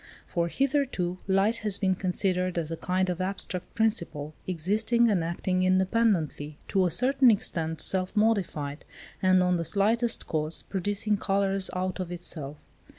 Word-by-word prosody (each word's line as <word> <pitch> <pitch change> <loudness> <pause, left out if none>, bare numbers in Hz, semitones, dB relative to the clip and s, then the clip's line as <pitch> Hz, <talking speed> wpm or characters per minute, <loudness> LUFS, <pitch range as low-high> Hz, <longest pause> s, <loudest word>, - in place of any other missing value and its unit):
For, 170 -2 -1
hitherto, 260 - -1
light 195 +4 +2
has 210 -3 -3
been 190 -2 +1
considered 185 -1 -1
as 165 -1 -2
a - - -2
kind 185 +2 -1
of 180 0 -2
abstract 185 -1 -4
principle, 170 -9 0
existing 215 +7 +2
and 180 -5 +1
acting 185 +2 -1
independently; 185 -6 +1
to 190 -2 +2
a - - 0
certain 255 - +4
extent 160 -7 0
self 185 +1 +2
modified, 180 -10 0 0.4
and 185 -1 +4
on 180 -1 +2
the 170 - -2
slightest 225 +6 +1
cause, 155 0 -2
producing 205 +2 -1
colours 195 -1 +1
out 185 +1 -2
of 180 -2 -4
itself. 155 -5 -5
185 Hz, 150 wpm, -27 LUFS, 170-205 Hz, 0.4 s, certain